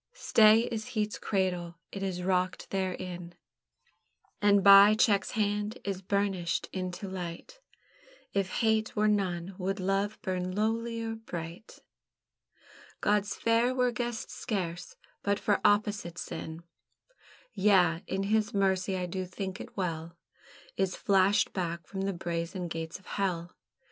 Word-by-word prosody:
Stay 220 - +5
is 225 0 -3
heat's 210 0 -1
cradle, 180 -4 -1 0.2
it 195 - -6
is 185 -2 -3
rocked 185 0 0
therein, 180 -2 -3 1.1
And 205 -1 +5
by 200 +2 +9
check's 210 -3 +2
hand 210 +1 0
is 195 -2 -3
burnished 195 -3 -1
into 185 +1 -4
light; 180 - -7 0.7
If 195 -1 0
hate 220 -1 +1
were 210 0 +3
none, 190 -3 0
would 195 +2 -2
love 195 +3 0
burn 185 0 -2
lowlier 225 +1 -1
bright? 170 +3 -8 1.2
God's 205 -1 +1
Fair 230 +2 +2
were 250 -1 +2
guessed 240 0 -4
scarce 180 -7 -4 0.3
but 200 0 +1
for 205 0 +1
opposite 205 -4 +2
sin; 160 0 -6 0.9
Yea, 185 -5 +4
and 195 +1 -1
His 215 0 +1
Mercy, 190 -1 +1
I 180 - -2
do 185 +1 -3
think 190 +1 -5
it - - -11
well, 170 -2 -3 0.6
Is 190 -1 0
flashed 195 +1 +3
back 170 -3 -3
from 195 +3 -5
the 195 0 -1
brazen 170 +1 -3
gates 160 +1 -5
of 190 - -22
Hell. 180 -3 -2
195 Hz, 130 wpm, -30 LUFS, 180-210 Hz, 1.2 s, by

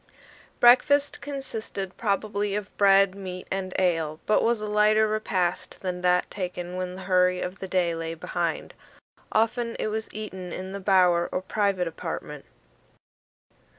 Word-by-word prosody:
Breakfast 280 +4 +5
consisted 225 -9 -5
probably 205 -1 -1
of 210 -1 -5
bread, 195 -1 +5
meat, 185 -2 -7
and 190 -1 -2
ale, 165 -4 0
but 215 - +3
was 235 -1 +2
a 215 - -4
lighter 210 +1 +3
repast 190 -5 -1
than 180 -1 -3
that 180 0 +2
taken 180 -2 -5
when 185 0 -4
the 190 - -8
hurry 180 -1 +3
of 180 +2 -5
the 190 - -5
day 180 -2 +1
lay 165 0 -4
behind. 170 0 -3 0.6
Often 230 +1 +1
it - - -1
was 220 +1 -4
eaten 190 -4 -7
in 185 +2 -6
the 200 - -5
bower 180 -3 +3
or 185 - -2
private 195 -3 0
apartment. 165 - -6
190 Hz, 150 wpm, -26 LUFS, 180-215 Hz, 0.6 s, Breakfast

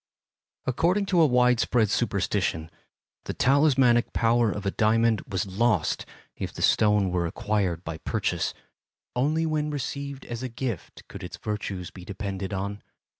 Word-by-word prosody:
According 175 +10 +2
to 175 - +6
a 160 - +6
wide 125 -2 +4
spread 115 -4 +2
superstition, 95 -8 0 0.5
the - - -4
talismanic 135 -3 +4
power 115 0 +3
of 105 0 -5
a 100 - +1
diamond 110 +1 +2
was 95 -2 -1
lost 100 -2 0 0.3
if - - -4
the - - -5
stone 105 -3 +3
were 85 -1 0
acquired 95 -2 -1
by 80 -2 -5
purchase; - - -1 0.6
only 155 +6 +1
when 155 -1 0
received 140 -1 -4
as 120 0 -5
a 130 - -3
gift 120 - -5
could - - -9
its - - -7
virtues 100 -4 -4
be 90 - -11
depended 95 0 -5
on. 100 +1 -3
110 Hz, 150 wpm, -26 LUFS, 100-130 Hz, 0.6 s, to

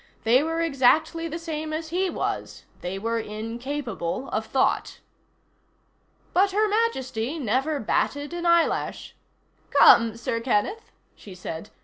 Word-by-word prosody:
They 235 +4 +5
were 325 +2 -1
exactly 315 +2 +2
the 325 +1 -4
same 315 -2 -5
as 315 0 -4
he 370 +3 0
was. - - -4 0.2
They 180 +2 -4
were 230 +3 -1
incapable 225 0 -4
of 220 +1 -2
thought. 265 +3 0 1.3
But 390 +3 +4
Her 430 +2 +3
Majesty 305 - -1
never 270 +3 0
batted 285 +6 -1
an 345 0 -2
eyelash. 340 -1 +1 0.5
"Come, 230 -1 +6
Sir 230 0 -2
Kenneth," 255 - -1 0.2
she 195 -3 -12
said. 180 +1 -7
275 Hz, 125 wpm, -25 LUFS, 225-330 Hz, 1.3 s, Come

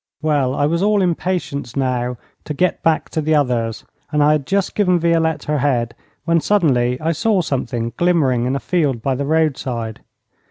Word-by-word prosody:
Well, 140 -4 +1
I 145 - +1
was 170 +3 0
all 205 -1 +3
impatience 170 -7 -2
now 125 -2 -1 0.3
to 150 - -4
get 180 +4 0
back 165 -1 +1
to 160 - -2
the 155 +1 +1
others, 120 -6 0 0.3
and 150 -1 +2
I 150 - +5
had 150 -3 0
just 195 -1 0
given 180 -4 +2
Violette 165 -2 +1
her 150 0 -1
head, 120 -4 0 0.3
when 165 -1 +2
suddenly 130 -12 +2
I 160 +1 0
saw 195 +4 +1
something 120 -6 -3
glimmering 145 -9 +2
in 130 +2 0
a - - -1
field 140 -11 -1
by 135 - +1
the 140 +2 -2
roadside. 135 -7 -1
150 Hz, 185 wpm, -19 LUFS, 125-170 Hz, 0.3 s, I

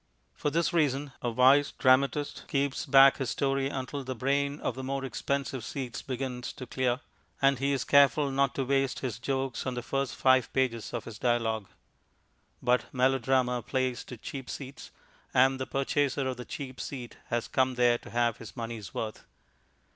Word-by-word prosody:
For - - -1
this 170 +4 0
reason 145 -3 +1
a 120 - 0
wise 130 +5 +5
dramatist 140 +2 +2
keeps 140 0 -1
back 135 0 +7
his 135 - -2
story 135 -1 0
until 135 +1 -4
the 130 0 -4
brain 140 +4 0
of - - -1
the 130 - -7
more 135 +1 -2
expensive 135 -1 -2
seats 125 +2 -5
begins 130 -1 -4
to 130 - -8
clear, 125 +1 -1 0.4
and 135 -2 +3
he 140 +1 +1
is 135 -2 0
careful 140 0 +4
not 135 0 +1
to 135 - -1
waste 135 0 0
his 120 -4 -3
jokes 135 0 -2
on 130 - -2
the 120 - -4
first 135 +1 -2
five 130 -1 +3
pages 125 -4 0
of 120 -2 -4
his 110 -2 -9
dialogue. 115 -4 0 1.0
But 125 -1 +1
melodrama 130 -1 +2
plays 130 +1 -1
to 125 - -9
cheap 135 +3 -7
seats, 135 0 -7 0.5
and 130 +1 +4
the 130 - -3
purchaser 140 0 0
of 130 -1 -3
the 125 - -7
cheap 130 -3 -7
seat 125 -4 -7
has 120 -1 -1
come 130 -1 +1
there 120 -1 +3
to - - -12
have 120 -1 +1
his 115 -2 -11
money's 115 -3 -6
worth. 110 -1 -4
130 Hz, 175 wpm, -29 LUFS, 125-135 Hz, 1.0 s, back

